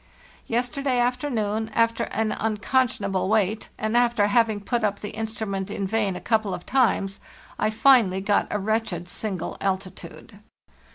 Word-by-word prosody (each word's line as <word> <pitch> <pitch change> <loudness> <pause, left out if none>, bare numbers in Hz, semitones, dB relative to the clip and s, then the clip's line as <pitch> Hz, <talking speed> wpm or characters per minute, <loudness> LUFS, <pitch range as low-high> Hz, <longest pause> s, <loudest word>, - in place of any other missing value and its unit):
Yesterday 250 +3 0
afternoon, 240 -4 0
after 230 0 +2
an 220 -1 -1
uncon 215 -1 -2 0.3
scionable 195 -4 -2
wait, 215 0 +1
and 215 +2 -2
after 240 -3 +3
having 220 0 +2
put 235 +3 -2
up 205 -1 0
the 210 - -5
instrument 215 -3 -4
in 200 - -3
vain 205 -1 0
a - - -5
couple 220 -3 0
of 175 - -10
times, 210 -7 +1 0.4
I 215 - +2
finally 220 -4 +4
got 205 +1 +1
a - - -1
wretched 205 -4 -2
single 190 -1 -4
altitude. 195 +2 -5
215 Hz, 150 wpm, -25 LUFS, 200-230 Hz, 0.4 s, finally